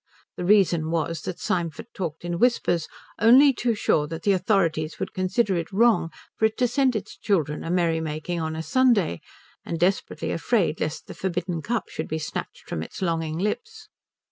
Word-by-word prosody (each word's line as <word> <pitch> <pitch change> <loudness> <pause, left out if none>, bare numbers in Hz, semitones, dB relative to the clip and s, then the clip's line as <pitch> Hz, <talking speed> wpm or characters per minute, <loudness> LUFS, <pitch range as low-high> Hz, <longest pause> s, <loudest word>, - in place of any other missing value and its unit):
The - - -5
reason 175 -5 +4
was 165 -1 -1
that 180 - -5
Symford 170 -4 -2
talked 170 -3 -5
in 175 0 -2
whispers, 205 -9 +2 0.3
only 260 +6 +7
too 235 -1 0
sure 150 -7 +1
that 165 +1 -6
the 205 - +3
authorities 175 -5 +1
would - - -4
consider 190 +2 +1
it 165 - -4
wrong 220 -4 +3 0.3
for 220 - +4
it 220 - 0
to 250 - +3
send 260 0 +2
its 215 0 -4
children 155 -8 0
a - - -5
merrymaking 165 -1 -1
on 160 0 -3
a 160 - -4
Sunday, 235 - +2 0.4
and 170 - -4
desperately 185 +3 0
afraid 170 -3 +1
lest 155 +1 -3
the - - -9
forbidden 180 -2 -3
cup 235 +7 -2
should - - -5
be 160 - -2
snatched 155 - -6
from 80 - -3
its 80 - -6
longing 165 -2 -1
lips. 440 - -4
175 Hz, 180 wpm, -25 LUFS, 160-215 Hz, 0.4 s, only